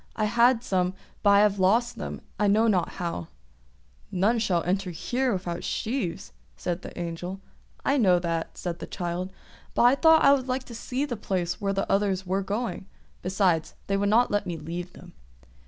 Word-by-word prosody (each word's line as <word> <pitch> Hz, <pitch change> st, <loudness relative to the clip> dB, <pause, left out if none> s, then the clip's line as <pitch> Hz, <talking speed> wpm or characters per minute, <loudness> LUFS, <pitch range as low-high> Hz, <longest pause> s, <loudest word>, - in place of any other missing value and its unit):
"I 215 Hz, -, 0 dB
had 235 Hz, +2 st, +4 dB
some, 185 Hz, -4 st, 0 dB, 0.3 s
but 205 Hz, -, +4 dB
I 200 Hz, 0 st, +7 dB
have 205 Hz, -1 st, +3 dB
lost 225 Hz, +6 st, +3 dB
them, -, -, -5 dB, 0.2 s
I 210 Hz, -, +3 dB
know 215 Hz, +3 st, +4 dB
not 190 Hz, -5 st, +1 dB
how." 170 Hz, -, -4 dB, 0.8 s
"None 210 Hz, +6 st, +2 dB, 0.3 s
enter 190 Hz, +1 st, 0 dB
here 245 Hz, +9 st, -1 dB
without 180 Hz, -3 st, -3 dB
sheaves," 190 Hz, -, -3 dB, 0.2 s
said 175 Hz, -, -3 dB
the -, -, -10 dB
Angel. 175 Hz, +2 st, -4 dB, 0.5 s
"I 275 Hz, -, +3 dB
know 185 Hz, -6 st, +5 dB
that," 170 Hz, -2 st, -3 dB
said 175 Hz, -2 st, -4 dB
the -, -, -6 dB
child. 175 Hz, +1 st, -4 dB, 0.4 s
"But -, -, +3 dB
I 245 Hz, +2 st, +7 dB
thought 320 Hz, +3 st, +5 dB
I 275 Hz, -, +8 dB
would 265 Hz, -2 st, 0 dB
like 255 Hz, 0 st, -1 dB
to 245 Hz, -, -11 dB
see 255 Hz, +4 st, -2 dB
the 255 Hz, -5 st, -3 dB
place 180 Hz, -3 st, -2 dB
where 200 Hz, -1 st, 0 dB
the 195 Hz, -, -1 dB
others 195 Hz, -1 st, +1 dB
were 190 Hz, +2 st, 0 dB
going; 205 Hz, 0 st, -3 dB, 0.3 s
besides, 185 Hz, -3 st, +1 dB
they 195 Hz, -, 0 dB
would 200 Hz, 0 st, +1 dB
not 235 Hz, +4 st, +4 dB
let 205 Hz, 0 st, 0 dB
me 170 Hz, -2 st, -3 dB
leave 175 Hz, +3 st, -6 dB
them." -, -, -14 dB
195 Hz, 190 wpm, -26 LUFS, 180-235 Hz, 0.8 s, I